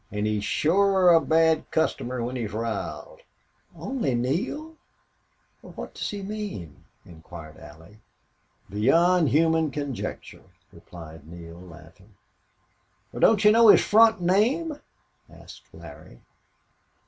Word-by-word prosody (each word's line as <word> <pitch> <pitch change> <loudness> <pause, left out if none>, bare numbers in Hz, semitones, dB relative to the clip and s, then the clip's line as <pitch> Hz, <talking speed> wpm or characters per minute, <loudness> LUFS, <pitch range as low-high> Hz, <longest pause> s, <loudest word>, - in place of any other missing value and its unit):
"An' 105 +1 -3
he's 105 -1 -1
shore 190 - +2
a 165 - +5
bad 160 0 +1
customer 125 -6 -2
when 125 +2 -4
he's 110 -4 -5
r'iled." 115 - -5 0.6
"Only 240 - -3
Neale? 220 - -3 0.9
What - - -10
does - - -5
he 200 -1 -6
mean?" 200 - -7 0.2
inquired 80 -2 -13
Allie. 80 +8 -15 0.7
"Beyond 160 - +2
human 160 +2 +2
conjecture," 140 -3 -6 0.3
replied 80 -3 -13
Neale, 85 0 -12
laughing. 90 +4 -16 1.0
"Wal, - - -7
don't 215 -2 +3
you 210 - +8
know 230 +1 +5
his - - +6
front 225 0 +5
name?" 250 - 0 0.5
asked - - -15
Larry. - - -14
150 Hz, 110 wpm, -25 LUFS, -, 1.0 s, you